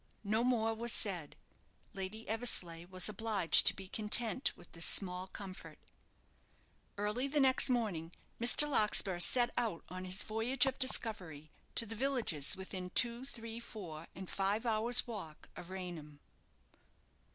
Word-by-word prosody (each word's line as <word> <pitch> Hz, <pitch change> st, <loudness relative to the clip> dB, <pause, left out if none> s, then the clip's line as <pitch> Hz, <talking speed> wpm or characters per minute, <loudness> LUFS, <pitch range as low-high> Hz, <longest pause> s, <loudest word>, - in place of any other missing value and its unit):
No 220 Hz, +3 st, -1 dB
more 225 Hz, -3 st, 0 dB
was 235 Hz, +1 st, -2 dB
said. 180 Hz, -10 st, -1 dB, 0.6 s
Lady 195 Hz, +3 st, -8 dB
Eversleigh 185 Hz, -7 st, -2 dB
was 185 Hz, -1 st, +1 dB
obliged 210 Hz, -4 st, +4 dB
to -, -, +7 dB
be 190 Hz, -1 st, -10 dB
content 220 Hz, +5 st, +2 dB
with -, -, -17 dB
this 165 Hz, -, -4 dB
small 185 Hz, -1 st, -2 dB
comfort. 190 Hz, -1 st, -11 dB, 1.2 s
Early 210 Hz, +6 st, -2 dB
the 295 Hz, +2 st, 0 dB
next 265 Hz, -1 st, +3 dB
morning 200 Hz, -10 st, -2 dB, 0.3 s
Mr. 245 Hz, +5 st, +7 dB
Larkspur 210 Hz, -8 st, +2 dB
set 240 Hz, +6 st, +4 dB
out 220 Hz, -9 st, -4 dB
on 185 Hz, +1 st, -7 dB
his 185 Hz, +2 st, -3 dB
voyage 235 Hz, +5 st, +2 dB
of 265 Hz, -1 st, -3 dB
discovery 180 Hz, -, -1 dB, 0.2 s
to 230 Hz, -, +4 dB
the 225 Hz, -, -7 dB
villages 225 Hz, -, -1 dB
within 190 Hz, -1 st, -7 dB
two, 235 Hz, +5 st, +2 dB
three, 230 Hz, -3 st, -8 dB
four, 175 Hz, -9 st, -10 dB
and 190 Hz, -1 st, -9 dB
five 200 Hz, +5 st, -1 dB
hours' 230 Hz, +2 st, +3 dB
walk 195 Hz, -10 st, -9 dB
of 175 Hz, -, -11 dB
Raynham. 175 Hz, -6 st, -9 dB
210 Hz, 140 wpm, -33 LUFS, 185-235 Hz, 1.2 s, to